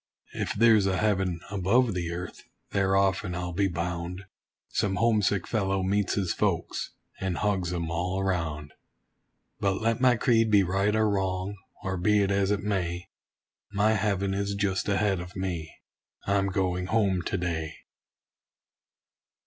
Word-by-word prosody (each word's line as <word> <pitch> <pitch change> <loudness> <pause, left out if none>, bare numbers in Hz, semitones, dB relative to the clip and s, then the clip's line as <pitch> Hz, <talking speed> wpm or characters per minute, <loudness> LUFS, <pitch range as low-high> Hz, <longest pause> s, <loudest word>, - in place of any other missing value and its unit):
If - - -2
there's 110 -2 +5
a 95 -1 +1
heaven 95 -5 0
above 105 +4 +2
the 85 -2 -2
earth, 90 0 -6 0.3
there 95 -1 +2
often, 95 -1 +1
I'll 90 0 -4
be 100 +3 +2
bound, 90 +1 -4 0.4
Some 95 -2 0
homesick 105 -5 +2
fellow 95 -3 0
meets 100 +1 +1
his 95 -5 0
folks, 95 -3 -1 0.2
and 95 -2 -2
hugs 95 -4 0
'em 85 -2 -3
all 90 +3 -1
around. 85 -6 -2 0.9
But 100 -1 +1
let 115 +1 0
my 125 -1 +5
creed 115 -1 +3
be 100 -2 +5
right 95 +3 +1
or 110 0 +3
wrong, 95 -1 -1 0.3
or 95 -1 -2
be 105 +3 +3
it 100 - 0
as 100 0 +2
it 100 -1 +1
may, 90 -4 -2 0.6
My 105 +2 +3
heaven 100 -2 0
is 100 0 -1
just 100 -1 -1
ahead 100 -1 +1
of 90 0 -8
me 90 -4 -3 0.5
I'm 100 0 +2
going 90 -2 -1
home 100 -3 +2
to 90 - -2
day. 80 -3 -3
95 Hz, 150 wpm, -27 LUFS, 90-100 Hz, 0.9 s, there's